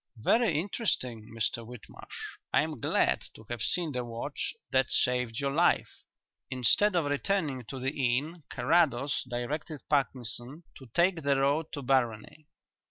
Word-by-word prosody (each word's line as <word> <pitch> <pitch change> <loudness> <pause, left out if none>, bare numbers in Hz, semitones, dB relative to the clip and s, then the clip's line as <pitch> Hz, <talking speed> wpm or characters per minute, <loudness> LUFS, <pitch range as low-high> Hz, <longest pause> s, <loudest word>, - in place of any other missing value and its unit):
Very 170 - +3
interesting, 130 - -2
Mr 115 +1 -1
Whitmarsh. 120 -1 -10
I - - +4
am 155 -4 -5
glad - - +2
to 110 - -12
have 120 -2 -3
seen 170 +6 +1
the 125 -2 -2
watch 115 -1 -4 0.2
that 130 -1 +3
saved 125 -1 +1
your 140 -1 0
life." 165 +5 +2 0.5
Instead 130 - +3
of 170 -4 +2
returning 145 - -1
to 135 +4 -6
the 130 +1 -1
inn 145 +5 0
Carrados 145 -5 +2
directed 145 +5 -4
Parkinson 135 +1 -1
to 130 - -12
take 175 -1 +3
the 140 -1 +2
road 140 +4 +1
to 145 - -4
Barony. 130 +2 0
135 Hz, 145 wpm, -30 LUFS, 120-155 Hz, 0.5 s, I